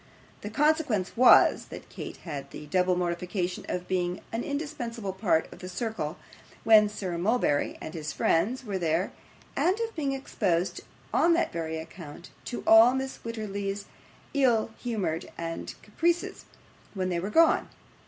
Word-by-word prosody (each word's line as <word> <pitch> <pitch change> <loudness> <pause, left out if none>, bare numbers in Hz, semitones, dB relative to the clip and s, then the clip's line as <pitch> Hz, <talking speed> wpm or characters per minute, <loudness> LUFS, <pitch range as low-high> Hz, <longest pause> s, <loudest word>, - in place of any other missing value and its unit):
The 205 - -5
consequence 280 - +1
was, 250 +2 +6
that - - -10
Kate - - -7
had 145 -5 -7
the 150 - -9
double 180 +4 +2
mortification 180 +1 -2
of 180 0 -3
being 180 -1 -1
an 225 +1 -2
indispensable 245 -9 -4
part 185 -5 +1
of - - -14
the 180 - -7
circle 185 -5 -3 0.5
when 215 -2 +7
Sir 185 -5 -4
Mulberry 190 -7 +1
and 155 - -7
his 155 -2 -4
friends 245 +10 +1
were 200 -3 -2
there, 165 +2 0 0.4
and 375 +5 +2
of 455 -1 -3
being 285 -4 -1
exposed, 190 -9 -1 0.3
on 340 - +4
that 340 - +1
very 160 -1 -3
account, 160 0 -10
to 245 - -5
all 225 +3 +8
Mrs. 265 0 -3
Wititterly's 205 -3 -4 0.5
ill 240 -6 +2
humours 200 -9 -2
and 165 0 -5
caprices 335 +10 -1 0.5
when 185 -1 -1
they 175 -1 0
were 190 +4 -3
gone. 325 +8 +4
200 Hz, 150 wpm, -28 LUFS, 175-245 Hz, 0.5 s, all